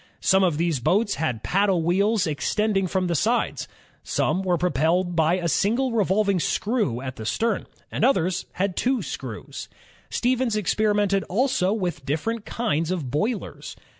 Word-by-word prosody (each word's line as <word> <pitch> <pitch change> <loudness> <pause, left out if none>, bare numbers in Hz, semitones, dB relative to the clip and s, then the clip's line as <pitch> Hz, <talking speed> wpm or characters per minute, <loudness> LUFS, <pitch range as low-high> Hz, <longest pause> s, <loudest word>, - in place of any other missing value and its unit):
Some 190 0 +4
of 170 -5 +2
these 165 -4 0
boats 200 - +2
had 125 -9 -1
paddle 195 -3 +2
wheels 200 +4 +2
extending 195 +5 0
from 185 +1 0
the 175 - 0
sides; 225 - 0 0.3
some 190 - 0
were 180 -2 +1
propelled 175 +2 +1
by 165 +1 +3
a 175 -2 -2
single 235 +10 +1
revolving 200 -2 +2
screw 205 - 0
at 130 -1 -6
the 110 - -6
stem, 220 - -1 0.2
and - - -2
others 190 -8 +2
had 190 0 -1
two 255 0 0
screws. - - -7 0.4
Stevens 250 -2 0
experimented 205 -1 +1
also 235 -2 +1
with 180 -9 -2
different 205 +11 -2
kinds 170 -9 -1
of 165 -9 -3
boilers. 210 - -3
190 Hz, 150 wpm, -24 LUFS, 170-215 Hz, 0.4 s, Some